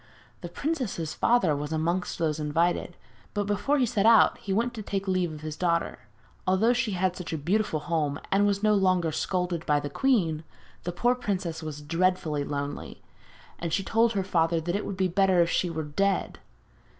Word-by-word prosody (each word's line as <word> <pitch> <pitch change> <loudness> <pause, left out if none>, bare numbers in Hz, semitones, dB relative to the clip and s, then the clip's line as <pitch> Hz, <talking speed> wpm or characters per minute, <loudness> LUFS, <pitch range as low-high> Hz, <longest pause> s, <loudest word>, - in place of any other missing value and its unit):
The - - -6
princess's 250 - -3
father 210 -11 +2
was 145 +1 -4
amongst 170 +3 -1
those 160 -2 -1
invited, 165 +3 0 0.4
but 205 - +1
before 205 +8 +1
he 260 - +3
set 220 -3 +1
out 230 -1 +6
he 200 - -5
went 235 +5 +1
to 225 - -6
take 195 -1 -3
leave 185 -3 +1
of 155 -1 -9
his 155 -1 -5
daughter. 170 0 0 0.5
Although 200 +6 +3
she 235 -4 -1
had 185 0 0
such 180 - -6
a - - -1
beautiful 170 +1 0
home, 155 -3 -1
and 200 +1 +4
was 200 0 0
no 215 0 +4
longer 185 -4 +2
scolded 180 0 -1
by 150 -1 +3
the 145 -1 -5
queen, 170 - +1 0.4
the 175 - -1
poor 240 +8 +2
princess 190 -9 -3
was 150 -2 -6
dreadfully 165 -2 0
lonely, 140 0 -5 0.6
and 170 -1 -3
she 195 +4 0
told 225 +3 +2
her 195 -2 0
father 165 -3 +1
that 175 +3 -2
it 205 - -2
would 195 - -5
be 190 0 +2
better 190 0 +3
if 170 - -2
she 180 - +1
were 160 -1 -3
dead. 195 +7 -1
180 Hz, 195 wpm, -27 LUFS, 160-205 Hz, 0.6 s, out